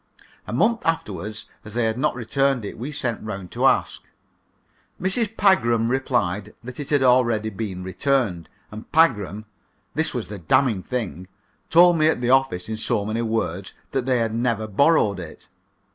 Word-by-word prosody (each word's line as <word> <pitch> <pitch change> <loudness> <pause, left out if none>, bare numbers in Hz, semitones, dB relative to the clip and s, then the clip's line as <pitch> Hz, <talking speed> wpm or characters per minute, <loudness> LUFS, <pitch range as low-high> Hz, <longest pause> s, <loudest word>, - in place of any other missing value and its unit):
A - - -5
month 215 - +1
afterward, 105 - -2 0.3
as 105 0 -11
they 120 - +1
had 110 0 0
not - - +1
returned 130 0 0
it, - - -6
we 130 +6 -6
sent 125 -6 -3
round 100 -4 -6
to - - +2
ask. - - +1 1.0
Mrs. 215 +4 0
Pagram 120 - +3
replied 105 -6 -1
that 125 +3 -9
it 145 - -6
had 145 -3 +2
already 120 -4 +3
been 95 -3 -5
returned, 95 - -1 0.2
and 110 +1 -10
Pagram 110 - +2 0.5
this - - 0
was - - -4
the 105 0 -7
damning 115 - +2
thing 95 -6 -4 0.4
told 175 0 +6
me 155 - +4
at 160 - +1
the 120 0 0
office 130 -10 +2
in 110 0 -4
so 110 -2 0
many 110 +2 -2
words 110 -5 -2 0.2
that 130 -2 -1
they 130 -1 +2
had 115 -2 -1
never 115 -2 0
borrowed 110 - +2
it. 85 -3 -10
115 Hz, 170 wpm, -23 LUFS, 105-135 Hz, 1.0 s, told